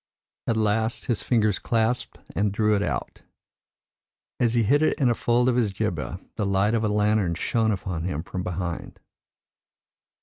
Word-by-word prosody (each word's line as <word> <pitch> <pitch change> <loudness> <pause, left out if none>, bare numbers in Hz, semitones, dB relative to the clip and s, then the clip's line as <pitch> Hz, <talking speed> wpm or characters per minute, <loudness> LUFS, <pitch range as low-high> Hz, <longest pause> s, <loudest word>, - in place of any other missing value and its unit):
At 115 - +1
last 110 +1 +1
his 120 -4 0
fingers 110 -6 +2
clasped 115 +1 0 0.2
and 105 0 +1
drew 105 +1 +2
it 100 - 0
out; - - -3 1.2
as 120 -1 +2
he 115 - +3
hid 140 +8 +3
it 155 - +2
in 130 -4 +4
a - - +3
fold 120 +1 +2
of 125 - +3
his 115 -5 +2
jibbeh, 90 - -3 0.2
the 105 - 0
light 100 +2 +2
of 115 -1 +1
a 105 - +1
lantern 105 -4 +2
shone 110 +6 +1
upon 95 -4 -3
him 80 -4 -2
from 90 0 -5
behind." 90 -1 -4
105 Hz, 170 wpm, -25 LUFS, 95-115 Hz, 1.2 s, in